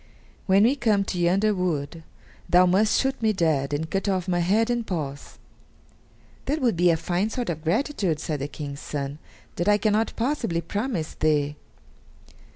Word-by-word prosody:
"When 195 +1 +5
we 250 +5 +4
come 220 -7 +2
to 185 -2 -4
yonder 195 +5 +2
wood, 165 -4 -2 0.5
thou 180 +1 +6
must 195 +4 +3
shoot 270 -2 -1
me 220 -1 +2
dead 155 -7 +1
and 150 +2 -2
cut 195 +4 -1
off 185 -2 -1
my 175 -1 +1
head 215 +7 +2
and 240 -1 0
paws." 145 -8 -5 1.1
"That 300 +3 -1
would 245 - +1
be 175 +1 +3
a 165 - +3
fine 180 +5 -1
sort 240 -4 -2
of 155 -1 -7
gratitude," 190 - 0
said 150 -1 -3
the 140 - -3
King's 145 -1 -7
son; 140 0 -5 0.4
"that 175 - -1
I 210 0 +5
cannot 215 +2 +1
possibly 230 - -1
promise 200 -1 -3
thee." 150 -1 +1
180 Hz, 170 wpm, -25 LUFS, 160-215 Hz, 1.1 s, thou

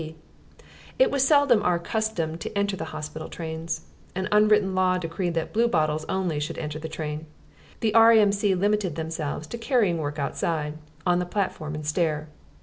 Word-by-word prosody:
C. 160 0 -7 0.8
It - - +4
was 280 - +1
seldom 285 -7 +5
our 180 -4 +2
custom 170 -3 -2
to - - -5
enter 200 -1 +1
the 160 - -5
hospital 155 0 -6
trains. 160 -1 -4 0.3
An 190 0 -1
unwritten 210 -2 +4
law 185 0 +2
decreed 175 0 -3
that 165 -1 -2
Bluebottles 155 -9 +1
only 180 -5 -1
should 150 - -4
enter 150 0 -4
the 160 +1 -6
train: 155 0 -5 0.5
the 220 -2 +1
R.A.M.C. 210 -3 +5
limited 200 -3 +1
themselves 160 -2 -4
to 235 +10 -7
carrying 225 - +2
work 145 -1 -3
outside, 150 +1 -2 0.3
on 175 -1 +3
the 180 - -2
platform 175 -6 -2
and 150 0 -6
stair. 150 -1 0
170 Hz, 165 wpm, -25 LUFS, 155-205 Hz, 0.8 s, seldom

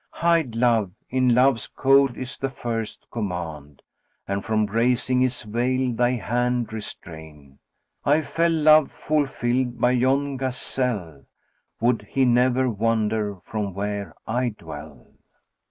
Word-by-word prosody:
'Hide 165 -8 +1
Love!' 115 -6 +2 0.2
in 130 -2 +3
Love's 125 -3 +3
code 135 -1 +3
is 130 +1 -5
the 135 - -1
first 115 -4 -5
command; 85 - -5 0.2
* - - -47
And 100 0 -2
from 110 -1 +1
raising 125 +4 +1
his 130 -1 0
veil 125 +3 0
thy 120 +2 +2
hand 120 0 -1
restrain: 80 -9 -9 0.4
I 150 +3 +3
fell 165 +2 +1
love 155 -2 +5
fulfilled 130 -4 -1
by 125 - +3
yon 135 +2 +1
gazelle: 125 - -3 0.3
* - - -46
Would 115 -3 +1
he 135 -1 +2
never 125 +1 +3
wander 110 -2 0
from 105 -4 -4
where 100 -3 -4
I 125 +2 0
dwell!" - - -10
120 Hz, 130 wpm, -24 LUFS, 105-130 Hz, 0.4 s, love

